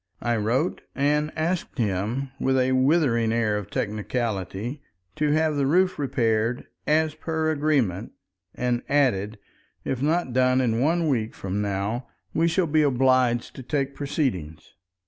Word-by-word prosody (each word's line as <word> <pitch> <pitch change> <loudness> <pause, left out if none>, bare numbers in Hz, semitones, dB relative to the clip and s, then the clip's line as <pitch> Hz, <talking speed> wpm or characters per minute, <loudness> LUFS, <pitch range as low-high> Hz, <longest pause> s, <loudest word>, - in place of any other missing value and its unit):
I 120 0 +1
wrote 120 - 0
and 150 +2 +1
asked 165 0 -2
him, 115 +5 -1
with 130 0 +2
a 130 0 +2
withering 130 -4 +3
air 115 -2 +1
of 105 -1 -4
technicality, 110 - -3 0.4
to 150 -1 +1
have 155 -1 +2
the 140 -1 +1
roof 180 +4 +2
repaired 115 -3 0 0.2
"as 155 0 +2
per 160 0 -1
agreement," 135 - 0 0.4
and 120 -1 0
added, 115 -8 +1 0.5
"if 130 -2 -2
not 155 -2 +1
done 130 0 +3
in 115 -3 +1
one 165 +3 +2
week 115 -6 -1
from 100 +1 -3
now 105 +5 -2 0.3
we 165 +2 +2
shall 170 +2 +2
be 155 0 +2
obliged 130 -3 +2
to - - -6
take 140 +1 -2
proceedings." 95 - -3
130 Hz, 145 wpm, -25 LUFS, 115-150 Hz, 0.5 s, withering